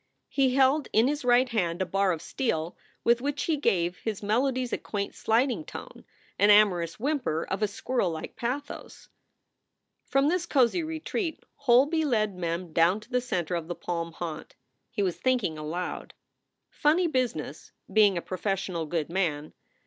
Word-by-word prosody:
He 265 -2 +2
held 270 +2 +3
in 225 +3 +5
his 295 0 -1
right 250 +1 +4
hand 180 -8 -1
a 185 - +1
bar 195 +2 +1
of 165 -1 -4
steel 170 - -2 0.3
with 235 +1 +3
which 285 +1 -2
he 325 - +1
gave 180 - 0
his 215 -2 -4
melodies 250 +3 0
a - - 0
quaint 200 -1 -4
sliding 245 +6 +1
tone, - - -10 0.3
an 205 - +5
amorous 190 -5 +4
whimper 255 - -1
of 195 - -4
a 210 - +3
squirrellike 195 -6 -2
pathos. 260 +5 -5 1.0
From 275 +1 +2
this 345 +1 0
cozy 270 +4 +3
retreat 320 +2 -3
Holby 280 +4 +3
led 215 -8 +1
Mem 170 -1 -3
down 170 +5 +4
to - - -18
the 250 0 +2
center 180 -8 -2
of 170 -2 -2
the 175 - -4
palm 170 -1 -4
haunt. 165 -2 -6 0.3
He 225 -4 -2
was 180 -3 -1
thinking 250 -11 +1
aloud: 170 +4 -5 0.6
"Funny 320 +5 +2
business, 245 - -2 0.2
being 205 -4 +5
a 170 - -3
professional 185 -3 -2
good 160 -1 -1
man. 160 -5 -2
215 Hz, 160 wpm, -27 LUFS, 175-265 Hz, 1.0 s, in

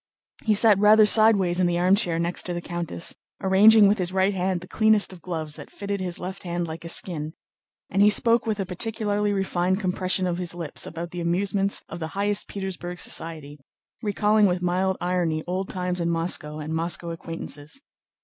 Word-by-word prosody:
He 215 -2 +3
sat 210 -1 +5
rather 215 +1 +6
sideways 205 -5 +4
in 180 - +3
the 175 0 0
armchair 180 -1 +2
next 170 +1 0
to 175 - -3
the - - -2
countess, 170 - -1 0.3
arranging 205 +3 +6
with 205 +1 +2
his 180 -1 -1
right 190 +1 +1
hand 185 -1 -1
the 180 - -11
cleanest 215 -2 +2
of 175 - -14
gloves 160 -3 -4
that 145 - -10
fitted 200 0 -5
his 180 -2 -2
left 185 +1 -7
hand 175 -1 -3
like 160 0 -8
a 170 - -6
skin, 160 -3 -3 0.5
and 195 - 0
he 205 - +7
spoke 230 +2 +3
with 215 -2 -1
a 195 - -1
particularly 210 +2 -2
refined 190 -1 0
compression 185 -1 0
of 175 -1 -2
his 175 -1 -3
lips 170 -3 -4
about 170 +1 -7
the 175 - -5
amusements 195 +3 -1
of 170 - -8
the 160 - -4
highest 205 0 0
Petersburg 185 -3 -6
society, 155 -4 -2 0.4
recalling 210 0 +2
with 180 -1 0
mild 185 +2 0
irony 175 -3 -1
old 185 +2 -3
times 180 -1 -2
in 170 - 0
Moscow 165 -2 -1
and 155 +1 -5
Moscow 170 +1 -2
acquaintances. 165 - -7
180 Hz, 190 wpm, -24 LUFS, 170-200 Hz, 0.5 s, he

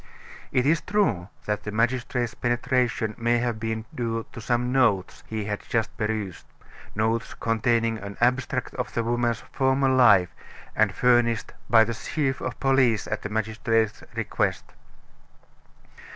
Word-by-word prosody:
It 125 -1 +2
is 160 +4 +3
true 115 - 0 0.2
that 105 0 -1
the - - -5
magistrate's 120 +1 0
penetration 120 -2 0
may 120 +1 +2
have 120 -2 -1
been 110 0 -3
due 115 -2 -2
to 115 - -8
some 120 +2 0
notes 115 -8 +1
he 110 -2 -3
had 105 0 -2
just 115 -2 0
perused 105 -4 -3 0.5
notes 110 +1 -1
containing 115 0 +1
an 100 0 -8
abstract 125 +2 0
of - - -4
the 115 - +1
woman's 120 -1 0
former 135 0 +2
life, 120 -9 +5 0.4
and 110 -2 +3
furnished 120 -1 +2 0.2
by 115 -1 +7
the 115 +1 -2
chief 135 +2 -2
of 130 - -4
police 130 -6 +3
at - - -3
the 105 - -5
magistrate's 110 0 0
request. 115 -2 -1
115 Hz, 140 wpm, -25 LUFS, 110-125 Hz, 0.5 s, by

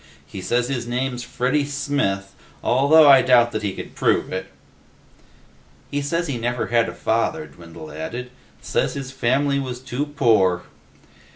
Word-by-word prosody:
He 95 +6 -8
says 120 +6 0
his 125 -3 -3
name's 125 0 -2
Freddy 130 +4 0
Smith, 140 -9 -2 0.3
although 145 +5 +5
I 135 -2 +8
doubt 120 -2 +4
that 110 - -3
he 100 -2 -2
could - - -8
prove - - +1
it." - - -4 1.4
"He 145 - -1
says 170 +4 -1
he 140 -7 -3
never 120 +1 -1
had 120 -1 +2
a - - -9
father," 150 +8 -1
Dwindle 80 -2 -12
added. 120 +12 -6 0.3
"Says - - -1
his 135 -2 -5
family 135 +2 +1
was 125 -2 -5
too 130 +3 -4
poor." 110 -11 +2
125 Hz, 155 wpm, -22 LUFS, 115-140 Hz, 1.4 s, I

